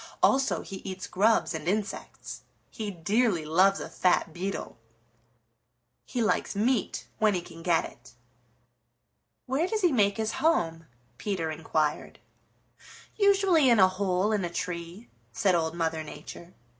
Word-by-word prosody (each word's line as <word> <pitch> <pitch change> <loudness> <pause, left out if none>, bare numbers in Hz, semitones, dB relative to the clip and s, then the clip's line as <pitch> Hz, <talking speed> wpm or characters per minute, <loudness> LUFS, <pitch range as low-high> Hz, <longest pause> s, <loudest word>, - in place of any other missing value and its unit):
"Also 270 0 +3
he 195 - -7
eats 185 0 -6
grubs 220 +2 +2
and 160 0 -5
insects. 205 +2 -3 0.3
He 215 -3 -4
dearly 195 0 +1
loves 190 +5 +4
a - - -5
fat 175 -3 +1
beetle. 190 -4 -5 1.3
He 240 - -1
likes 210 - 0
meat 225 +2 0
when 215 -2 +3
he 180 - -1
can 165 - -12
get 165 -1 +2
it." - - -14 1.3
"Where 270 +7 0
does 435 +1 -1
he 355 -3 +4
make 205 -5 +2
his 220 0 -1
home?" 165 - +1 0.3
Peter 180 -6 -2
inquired. 155 -1 -2 1.0
"Usually 390 -8 +4
in 235 - +5
a 190 - +8
hole 185 +1 0
in 210 -3 0
a 175 - -2
tree," 175 +5 -5 0.2
said 195 -2 +2
Old 165 -1 0
Mother 160 -2 -1
Nature. 155 +3 -10
195 Hz, 140 wpm, -28 LUFS, 170-225 Hz, 1.3 s, a